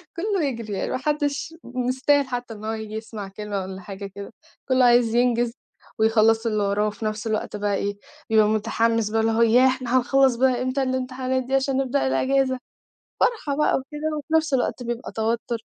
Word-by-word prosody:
كلّه 385 Hz, -1 st, -1 dB
يجري 230 Hz, -6 st, -4 dB
يعني 195 Hz, -, -2 dB
ما -, -, 0 dB
حدّش 295 Hz, +2 st, -1 dB
مستاهل 260 Hz, +3 st, +1 dB
حتى 245 Hz, -2 st, -4 dB
إن 215 Hz, 0 st, -9 dB
هو 220 Hz, -, -1 dB
ييجي 220 Hz, -1 st, -6 dB
يسمَع 220 Hz, -2 st, -6 dB
كلمة 205 Hz, 0 st, -4 dB
والّا 190 Hz, 0 st, -7 dB
حاجة 195 Hz, +2 st, -8 dB
كده، 200 Hz, +2 st, -9 dB, 0.4 s
كلّه 255 Hz, -1 st, +4 dB
عايز 240 Hz, -1 st, +4 dB
ينجِز 240 Hz, -1 st, +2 dB, 0.5 s
ويخلَّص 225 Hz, +1 st, +3 dB
اللي 215 Hz, -2 st, +1 dB
وراه 205 Hz, +1 st, +1 dB
وفي 215 Hz, +1 st, -5 dB
نفس 215 Hz, +1 st, -3 dB
الوقت 215 Hz, -1 st, -2 dB
بقى 205 Hz, -1 st, 0 dB
إيه، 200 Hz, 0 st, -2 dB, 0.3 s
بيبقى 215 Hz, -1 st, +5 dB
متحمِّس 225 Hz, 0 st, +1 dB
بقى 225 Hz, +1 st, +1 dB
اللي 225 Hz, 0 st, +2 dB
هو 225 Hz, +1 st, +1 dB
ياه! 245 Hz, +3 st, +6 dB
إحنا 255 Hz, -1 st, +1 dB
هنخلّص 265 Hz, 0 st, +3 dB
بقى 255 Hz, 0 st, +2 dB
إمتى 255 Hz, +2 st, 0 dB
الامتحانات 260 Hz, 0 st, -1 dB
دي 265 Hz, +2 st, -1 dB
عشان 270 Hz, 0 st, +1 dB
نبدأ 270 Hz, -, +1 dB
الإجازة. 260 Hz, -, +1 dB, 0.6 s
فرحة 310 Hz, -, +1 dB
بقى 300 Hz, -, +3 dB
وكده، 300 Hz, +3 st, -4 dB
وفي 305 Hz, +3 st, -5 dB
نفْس 315 Hz, -3 st, +2 dB
الوقت 250 Hz, 0 st, 0 dB
بيبقى 240 Hz, 0 st, -5 dB
توتُّر، 230 Hz, +2 st, -1 dB
240 Hz, 185 wpm, -24 LUFS, 220-265 Hz, 0.6 s, ياه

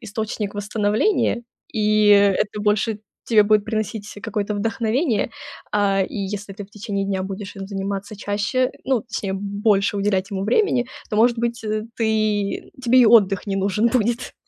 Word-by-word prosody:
источник 215 Hz, -1 st, -4 dB
восстановления, 210 Hz, -, 0 dB, 0.3 s
и 215 Hz, -1 st, +3 dB
это 205 Hz, +1 st, +4 dB
больше 210 Hz, +1 st, 0 dB, 0.2 s
тебе 220 Hz, -3 st, +5 dB
будет 210 Hz, 0 st, +3 dB
приносить 215 Hz, -1 st, -3 dB
какое-то 210 Hz, -1 st, -2 dB
вдохновение. 225 Hz, +4 st, 0 dB, 0.4 s
А, 200 Hz, -2 st, +2 dB
и -, -, -9 dB
если 200 Hz, 0 st, -4 dB
ты 205 Hz, +1 st, -8 dB
в 195 Hz, -, -21 dB
течение 200 Hz, -1 st, -3 dB
дня 190 Hz, -1 st, -1 dB
будешь 195 Hz, +1 st, -6 dB
им 195 Hz, -, -6 dB
заниматься 200 Hz, +1 st, -4 dB
чаще, 205 Hz, +6 st, 0 dB
ну, 260 Hz, -3 st, +1 dB
точнее, 205 Hz, -5 st, -4 dB
больше 205 Hz, +1 st, +1 dB
уделять 195 Hz, -1 st, 0 dB
ему 195 Hz, -1 st, -3 dB
времени, 250 Hz, -, +2 dB, 0.2 s
то, 210 Hz, -, -1 dB
может 235 Hz, +2 st, +4 dB
быть, 235 Hz, -1 st, -2 dB, 0.3 s
ты 215 Hz, -3 st, 0 dB
тебе 255 Hz, +2 st, +5 dB
и 240 Hz, -, +6 dB
отдых 200 Hz, -4 st, +4 dB
не 195 Hz, -1 st, -1 dB
нужен 200 Hz, +4 st, +1 dB
будет. 235 Hz, 0 st, 0 dB
210 Hz, 155 wpm, -22 LUFS, 200-225 Hz, 0.4 s, и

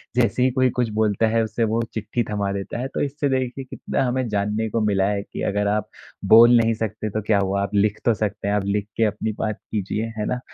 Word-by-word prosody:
जैसे 125 Hz, 0 st, +2 dB
ही 130 Hz, -, +4 dB
कोई 130 Hz, 0 st, +2 dB
कुछ 120 Hz, -1 st, -1 dB
बोलता 110 Hz, 0 st, +2 dB
है 115 Hz, +1 st, +2 dB
उसे 110 Hz, +1 st, -2 dB
वो 110 Hz, +1 st, +1 dB
चिट्ठी 110 Hz, +2 st, -2 dB
थमा 100 Hz, -2 st, -1 dB
देता 100 Hz, +4 st, -4 dB
है, 130 Hz, -, -2 dB
तो -, -, -4 dB
इससे 145 Hz, 0 st, -1 dB
देखिए 130 Hz, 0 st, -1 dB
कितना 130 Hz, -, -3 dB
हमें 130 Hz, 0 st, -1 dB
जानने 105 Hz, +2 st, -1 dB
को 115 Hz, -, -1 dB
मिला 100 Hz, -2 st, +2 dB
है 100 Hz, -1 st, -1 dB
कि -, -, -8 dB
अगर 105 Hz, +1 st, 0 dB
आप 105 Hz, +1 st, -1 dB, 0.4 s
बोल 120 Hz, +2 st, +9 dB
नहीं 115 Hz, 0 st, +2 dB
सकते 110 Hz, -1 st, -3 dB
तो 110 Hz, +2 st, -2 dB
क्या 105 Hz, 0 st, +2 dB
हुआ, 100 Hz, 0 st, 0 dB
आप 100 Hz, +1 st, -3 dB
लिख 105 Hz, +1 st, +2 dB
तो 120 Hz, -, +4 dB
सकते 105 Hz, -1 st, -3 dB
हैं, 100 Hz, -, +1 dB
आप 105 Hz, -, 0 dB
लिख 100 Hz, 0 st, -1 dB
के 115 Hz, -, +3 dB
अपनी 105 Hz, +1 st, -1 dB
बात 110 Hz, -2 st, -2 dB
कीजिए, 105 Hz, +1 st, -2 dB
है 105 Hz, -, -1 dB
ना? 125 Hz, -, -1 dB
110 Hz, 245 wpm, -22 LUFS, 105-120 Hz, 0.4 s, बोल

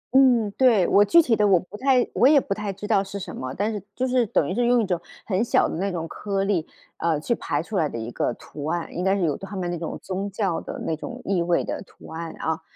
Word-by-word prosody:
嗯， 245 Hz, -6 st, +5 dB
对， 225 Hz, -7 st, +4 dB
我 205 Hz, -, +6 dB
具 335 Hz, +10 st, +6 dB
体 230 Hz, -5 st, +2 dB
的 210 Hz, -1 st, +3 dB
我 185 Hz, -3 st, +5 dB
不 185 Hz, -, -12 dB
太 255 Hz, +2 st, +3 dB
我 250 Hz, -, +5 dB
也 285 Hz, 0 st, +7 dB
不 200 Hz, -, -2 dB
太 210 Hz, -1 st, -4 dB
知 200 Hz, +2 st, -8 dB
道 205 Hz, -3 st, +2 dB
是 200 Hz, +1 st, -7 dB
什 190 Hz, -, -7 dB
么， 130 Hz, 0 st, -5 dB
但 210 Hz, +3 st, -1 dB
是 205 Hz, -, -4 dB
就 255 Hz, +1 st, 0 dB
是 250 Hz, -2 st, +2 dB
等 155 Hz, -, +1 dB
于 185 Hz, -, -2 dB
是 240 Hz, +2 st, +1 dB
用 245 Hz, 0 st, +4 dB
一 220 Hz, -, +1 dB
种 180 Hz, -2 st, -1 dB, 0.2 s
很 200 Hz, +2 st, +1 dB
小 -, -, +3 dB
的 -, -, -4 dB
那 195 Hz, +3 st, -1 dB
种 165 Hz, -2 st, -3 dB
颗 195 Hz, +3 st, -2 dB
粒， 190 Hz, -5 st, 0 dB, 0.3 s
啊， 165 Hz, -3 st, 0 dB
去 160 Hz, -, 0 dB
排 -, -, -2 dB
出 215 Hz, -, -4 dB
来 155 Hz, -4 st, +2 dB
的 -, -, -6 dB
一 115 Hz, +1 st, -5 dB
个 120 Hz, -, -1 dB
图 145 Hz, 0 st, -9 dB
案， 170 Hz, +2 st, -2 dB
应 180 Hz, -, -2 dB
该 190 Hz, +1 st, +3 dB
是 190 Hz, -, -1 dB
有 150 Hz, -4 st, +1 dB
他 195 Hz, +1 st, -8 dB
们 180 Hz, -2 st, -2 dB
那 175 Hz, -, -3 dB
种 165 Hz, -, -4 dB
宗 195 Hz, +1 st, -3 dB
教 195 Hz, -4 st, -1 dB
的 -, -, -7 dB
那 160 Hz, -, 0 dB
种 245 Hz, +10 st, -7 dB
意 195 Hz, -3 st, +1 dB
味 170 Hz, 0 st, +1 dB
的 -, -, -4 dB
图 -, -, -15 dB
案 165 Hz, 0 st, -5 dB
啊。 160 Hz, 0 st, -2 dB
195 Hz, 300 characters per minute, -24 LUFS, 170-220 Hz, 0.3 s, 也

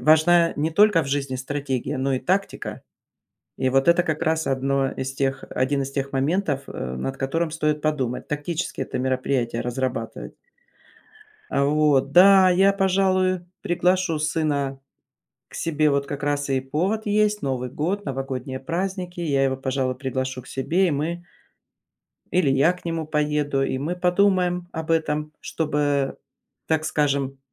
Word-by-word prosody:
важна 165 Hz, +2 st, +5 dB
не 155 Hz, +2 st, 0 dB
только 205 Hz, 0 st, +4 dB
в -, -, -6 dB
жизни 140 Hz, -2 st, -1 dB
стратегия, 135 Hz, -1 st, -3 dB
но 135 Hz, +1 st, 0 dB
и 130 Hz, -, -2 dB
тактика. 195 Hz, +2 st, -2 dB, 0.8 s
И 130 Hz, -, +1 dB
вот 135 Hz, +4 st, +2 dB
это 170 Hz, +1 st, +5 dB
как 155 Hz, -2 st, -2 dB
раз 160 Hz, -1 st, 0 dB
одно 135 Hz, 0 st, 0 dB
из 130 Hz, 0 st, -4 dB
тех 135 Hz, 0 st, -1 dB
один 140 Hz, +2 st, 0 dB
из 135 Hz, 0 st, -4 dB
тех 140 Hz, 0 st, -3 dB
моментов, 145 Hz, +1 st, 0 dB
э, -, -, -7 dB, 0.2 s
над 135 Hz, -, -4 dB
которым 160 Hz, +5 st, -1 dB
стоит 150 Hz, -1 st, -1 dB
подумать, 135 Hz, -6 st, -1 dB
тактически 150 Hz, +1 st, -3 dB
это 135 Hz, -, -3 dB
мероприятие 130 Hz, -2 st, -1 dB
разрабатывать. 125 Hz, -2 st, -4 dB, 1.2 s
А, 140 Hz, -, +2 dB
вот. 145 Hz, -2 st, +2 dB
Да, 190 Hz, 0 st, +7 dB
я, 190 Hz, +2 st, +4 dB
пожалуй, 185 Hz, -1 st, +2 dB, 0.2 s
приглашу 180 Hz, -1 st, +1 dB
сына 150 Hz, -3 st, -1 dB, 0.7 s
к -, -, -13 dB
себе 155 Hz, -2 st, +1 dB
.Вот 140 Hz, -1 st, +1 dB
как 145 Hz, 0 st, -5 dB
раз 145 Hz, 0 st, -1 dB
и 135 Hz, -1 st, +2 dB
повод 180 Hz, +11 st, -1 dB
есть- 210 Hz, 0 st, +2 dB
Новый 125 Hz, -2 st, -2 dB
год, 175 Hz, +10 st, -2 dB
новогодние 135 Hz, -1 st, -4 dB
праздники, 180 Hz, +3 st, -3 dB
я 140 Hz, -5 st, +1 dB
его, 135 Hz, -1 st, +1 dB
пожалуй, 130 Hz, -1 st, -1 dB
приглашу 130 Hz, 0 st, -3 dB
к 125 Hz, -, -17 dB
себе, 170 Hz, +8 st, +1 dB
и -, -, 0 dB
мы 165 Hz, +5 st, -3 dB, 1.1 s
или 175 Hz, -6 st, +3 dB
я 135 Hz, +6 st, +4 dB
к 180 Hz, -, -15 dB
нему 165 Hz, -2 st, -3 dB
поеду, 150 Hz, -2 st, 0 dB
и 130 Hz, -, -1 dB
мы 160 Hz, +6 st, -3 dB
подумаем 180 Hz, -1 st, +2 dB
об 160 Hz, 0 st, -5 dB
этом. 150 Hz, -2 st, 0 dB
Чтобы, 145 Hz, -3 st, -1 dB, 0.5 s
так 160 Hz, -1 st, +1 dB
скажем, 140 Hz, -3 st, 0 dB
150 Hz, 155 wpm, -23 LUFS, 135-175 Hz, 1.2 s, Да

